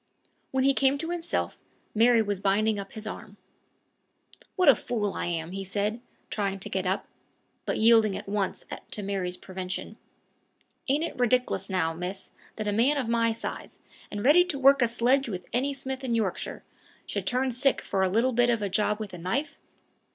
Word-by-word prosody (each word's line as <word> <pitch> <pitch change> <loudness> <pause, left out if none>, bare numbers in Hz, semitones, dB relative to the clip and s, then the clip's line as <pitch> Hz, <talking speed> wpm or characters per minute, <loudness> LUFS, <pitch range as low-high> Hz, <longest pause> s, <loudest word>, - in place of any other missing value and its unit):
When 265 0 +1
he 275 +1 +5
came 270 +1 +3
to 325 +4 -4
himself, 345 -1 -2 0.3
Mary 230 +1 +5
was 205 -2 -2
binding 205 +2 +2
up 195 0 -8
his 220 -1 -7
arm. 210 -1 -8 1.2
"What 365 -4 +2
a 280 - +10
fool 215 -4 -2
I - - -3
am!" 165 -1 -3
he 195 +1 -4
said, 205 +4 -2 0.3
trying 195 -2 -1
to - - -6
get 190 -1 -1
up, 190 +2 0 0.6
but - - 0
yielding 220 -3 +5
at - - -8
once 200 -1 -2 0.2
to 210 - -4
Mary's 190 -2 -2
prevention. 185 +3 -6 0.9
"Ain't 290 +4 +2
it 335 - -3
ridic'lous 250 -1 +1
now, 170 -4 0
miss, 180 +3 -6 0.2
that 215 -1 -4
a - - +2
man 255 +8 +3
of 255 -5 -1
my 230 -1 +2
size, 225 - -6 0.3
and 205 +1 -4
ready 315 +6 +7
to 345 -6 -3
work 275 0 +6
a 240 - +5
sledge 245 +3 +2
with 180 -4 -5
any 265 +4 +1
smith 265 -1 -5
in 240 -3 0
Yorkshire, 210 -5 -2 0.4
should - - -4
turn 255 +1 +1
sick 265 +3 +2
for 195 - -1
a 190 - +3
little 235 +6 +2
bit 245 +1 +3
of 230 -3 +1
a 200 - -1
job 210 +2 +1
with 210 -3 -6
a 180 - -7
knife? 275 - -2
220 Hz, 190 wpm, -27 LUFS, 195-260 Hz, 1.2 s, a